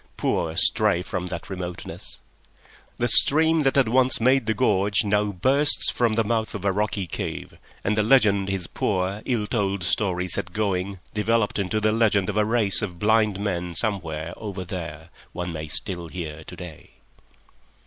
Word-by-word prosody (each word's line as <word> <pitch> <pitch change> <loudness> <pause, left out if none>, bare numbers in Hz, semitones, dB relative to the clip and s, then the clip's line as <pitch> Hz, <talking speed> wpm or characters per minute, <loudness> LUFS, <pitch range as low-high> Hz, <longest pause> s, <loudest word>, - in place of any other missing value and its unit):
Poor 80 -1 -1
stray 85 +1 +3
from 90 -1 -4
that 85 -1 -5
remoteness! 90 -2 -7 0.8
The 120 - 0
stream 160 +7 +5
that 135 -2 +1
had 135 -4 +4
once 130 +2 +3
made 130 0 +3
the 110 - +1
gorge 100 +1 +2
now 105 0 +1
bursts 130 - +2
from 120 -3 +1
the 115 - +2
mouth 110 0 -1
of 100 -1 -6
a 100 - +3
rocky 100 0 -1
cave, 85 - -5 0.3
and 105 - 0
the 105 - +2
legend 105 -5 +3
his 95 -2 -1
poor, 95 +2 -2
ill 115 -5 0
told 100 -4 -1
story 90 -1 0
set 90 0 -2
going 100 -2 -1 0.2
developed 105 0 0
into 100 +2 -1
the 110 0 +2
legend 105 -3 +2
of 105 - -2
a 105 - +3
race 105 -4 +2
of 90 -5 -4
blind 105 0 +2
men 90 -4 -3
somewhere 85 -6 -3
"over 100 -4 -6
there" 85 -3 -7 0.2
one 90 0 -4
may 80 -1 -5
still 85 +2 -3
hear 80 -3 -7
to - - -9
day. 90 -4 -11
100 Hz, 170 wpm, -24 LUFS, 90-110 Hz, 0.8 s, stream